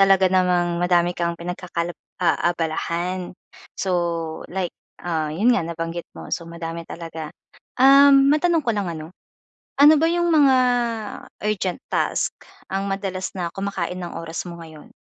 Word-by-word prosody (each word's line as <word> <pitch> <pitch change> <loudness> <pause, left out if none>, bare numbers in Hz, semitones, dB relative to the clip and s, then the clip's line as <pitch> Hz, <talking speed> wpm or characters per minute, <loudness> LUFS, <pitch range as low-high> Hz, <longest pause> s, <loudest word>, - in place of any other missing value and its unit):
talaga 195 -1 +5
namang 175 -2 +2
madami 175 0 +3
kang 170 -1 -2
pinagkaka 175 0 -4 0.2
aabalahan 175 +1 -1 0.4
so, 190 -1 -1 0.6
like, 185 -1 -3 0.3
ah, 160 -3 -1
iyon 205 +11 +3
nga 245 - +2
nabanggit 165 +1 -5
mo. - - -9
So 170 -1 -3
madami 165 0 -6
talaga. 165 -2 -7 0.5
Um, 275 +1 +7
matanong 330 0 +2
ko 230 - +1
lang 200 -4 -2
ano, 160 0 -7 0.7
ano 295 +2 +8
ba 325 - +4
yung 345 0 +1
mga 280 -4 +5 0.9
urgent 200 -1 -1
task, - - 0 0.4
ang 195 +1 -1
madalas 190 -1 -3
na 175 -2 -2
kumakain 190 -2 -3
ng 175 - -6
oras 165 +1 -5
mo 170 - -8
ngayon? 160 -2 -12
180 Hz, 140 wpm, -22 LUFS, 170-200 Hz, 0.9 s, ano